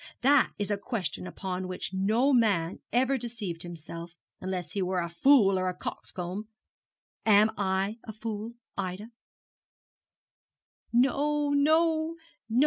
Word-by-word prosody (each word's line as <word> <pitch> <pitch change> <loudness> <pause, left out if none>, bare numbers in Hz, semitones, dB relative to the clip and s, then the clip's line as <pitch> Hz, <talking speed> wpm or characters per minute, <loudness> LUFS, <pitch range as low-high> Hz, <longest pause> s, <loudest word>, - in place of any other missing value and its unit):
That 275 +1 +5
is 205 0 -2
a 205 - 0
question 200 -4 -3
upon 185 -1 -4
which 185 0 -4
no 220 +9 +2
man 200 -8 +2
ever 260 +2 +2
deceived 215 -8 -5
himself, 170 0 -7 0.2
unless 185 -4 -4
he 200 - -2
were 185 0 0
a 170 - -1
fool 195 +1 +5
or 185 0 0
a 180 - -4
coxcomb. 185 +5 -5 0.8
Am 215 0 +5
I 195 +2 0
a - - -6
fool, 220 +1 -5 0.2
Ida?' 195 +4 -4 1.8
'No, 285 +4 +2
no, 315 +2 +3 0.3
no. 230 +3 +2
205 Hz, 130 wpm, -29 LUFS, 185-245 Hz, 1.8 s, That